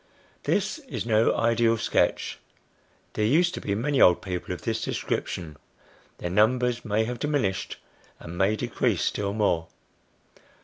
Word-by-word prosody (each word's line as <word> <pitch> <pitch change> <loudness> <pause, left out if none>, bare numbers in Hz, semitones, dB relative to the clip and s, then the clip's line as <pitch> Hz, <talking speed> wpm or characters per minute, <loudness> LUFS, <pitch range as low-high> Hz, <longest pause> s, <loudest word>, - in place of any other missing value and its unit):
This - - 0
is - - -3
no 110 -1 +3
ideal 115 0 +3
sketch. 110 - 0 0.7
There 105 - -1
used 170 +11 +3
to - - -5
be 100 - -1
many 135 +5 +1
old 90 -1 +6
people 90 -2 -4
of 90 - -5
this 115 -1 -1
description; 80 -4 -3 0.6
their 90 - -4
numbers 120 +4 +2
may 110 0 +1
have 120 0 -4
diminished, 130 -11 -1 0.4
and 85 - -8
may 95 +4 +2
decrease - - 0
still 100 -1 -1
more. 85 -6 +1
110 Hz, 140 wpm, -26 LUFS, 95-120 Hz, 0.7 s, old